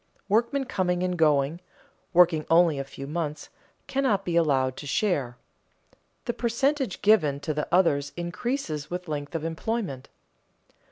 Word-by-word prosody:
Workmen 235 +7 +2
coming 180 -5 0
and 180 0 0
going, 150 0 +2 0.5
working 170 -3 +5
only 165 -3 +4
a - - -1
few 135 0 -9
months, 150 0 -4 0.4
cannot 260 -8 0
be 175 - -1
allowed 135 -6 +2
to 145 - -7
share; 140 - 0 0.9
the 240 - -1
percentage 255 +1 -1
given 155 -10 +4
to 155 +1 -2
the 150 0 -2
others 145 -6 +3
increases 175 - -3
with 180 0 -5
length 150 0 -4
of 160 - -2
employment. 165 - -3
170 Hz, 135 wpm, -26 LUFS, 145-205 Hz, 0.9 s, working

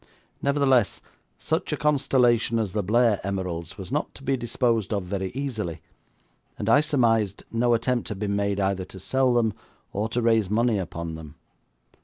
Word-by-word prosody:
Nevertheless, 140 -5 +2 0.4
such - - -2
a - - -1
constellation 130 -6 +2
as 110 -5 -1
the 105 - 0
Blair 110 +1 +3
emeralds 90 -3 -4
was 95 +2 -8
not 150 +2 -2
to 140 - -13
be 135 0 +1
disposed 120 -3 0
of 100 -3 0
very 95 +1 -3
easily, 110 - -3 0.8
and 105 - -4
I 140 +6 +6
surmised 115 -9 +1
no 120 +1 +3
attempt 120 0 -1
had 105 - -4
been 100 0 -1
made 100 0 0
either 95 -1 0
to 95 - -11
sell 130 +7 +1
them 110 -3 +2 0.4
or 105 +3 -1
to 120 +1 -1
raise 115 -4 +3
money 115 0 +2
upon 85 -2 -5
them. 80 -2 -9
110 Hz, 170 wpm, -25 LUFS, 100-125 Hz, 0.8 s, I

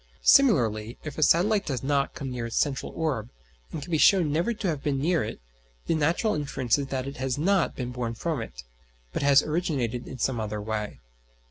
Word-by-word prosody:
Similarly, 120 - +4
if 155 -1 -6
a - - -1
satellite 195 +7 +3
does 130 -5 -2
not 140 0 0
come 135 -2 -5
near 120 -2 -3
its 115 - -6
central 140 -3 0
orb, 135 -9 -2 0.4
and 150 - -5
can 175 - -9
be 160 - +2
shown 175 -5 +5
never 170 +10 +1
to 215 -3 -3
have 155 -5 -1
been 140 -2 -1
near 160 +2 +1
it, 110 - -6 0.5
the - - +1
natural 165 +8 +1
inference 140 -4 0
is 140 - -3
that 130 -1 -3
it 140 +1 -7
has 130 0 -2
not 185 +4 +1
been 125 -1 -4
born 120 -2 -3
from 155 +1 -2
it, - - -8 0.5
but - - -2
has 140 0 +5
originated 140 -8 -2
in 130 - -7
some 125 0 -1
other 105 -1 -3
way. 105 0 -4
140 Hz, 210 wpm, -26 LUFS, 120-160 Hz, 0.5 s, shown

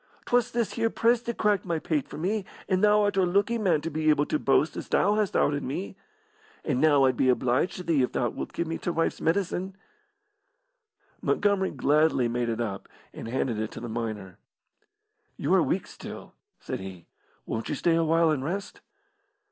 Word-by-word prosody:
'Twas 245 0 +2
this 230 -4 -1
here 225 -1 +1
press 230 +1 +2
that 235 -1 -5
cracked 210 -3 +2
my 170 -2 -1
pate 155 -2 -1
for - - -9
me, 195 +6 -1 0.2
and 185 +1 +1
thou 210 0 +5
art 205 -1 0
a - - +5
looky 200 +6 +1
man 175 -8 +2
to 165 - -4
be 155 +1 0
able 150 -1 +3
to 150 - -1
boast 145 +2 +2
as - - -6
thou 205 - +2
hast 210 -2 0
outed 145 0 +2
me. 180 +10 -4 0.7
And 135 -4 0
now 145 -3 +5
I'd 130 -1 +2
be 130 - +2
obliged 125 +7 +1
to 180 - -6
thee 160 -6 +2
if 125 - 0
thou 120 - 0
wilt - - -6
give 170 - -2
me 165 0 -4
t' - - -3
wife's 165 -1 -1
medicine." 185 +2 -1 1.5
Montgomery 200 -2 +1
gladly 145 -2 +2
made 120 0 -1
it 115 - -2
up 105 -5 -4 0.2
and - - -7
handed 120 -2 -1
it 110 0 -2
to - - -7
the 120 - -6
miner. 110 -5 -5 1.0
"You - - 0
are - - +5
weak - - 0
still," - - -10 0.3
said - - -5
he. 95 -3 -9 0.4
"Won't 110 0 -4
you - - -1
stay 170 - +2
awhile 165 0 +3
and 140 -4 -1
rest?" 190 +7 -4
160 Hz, 195 wpm, -27 LUFS, 130-195 Hz, 1.5 s, thou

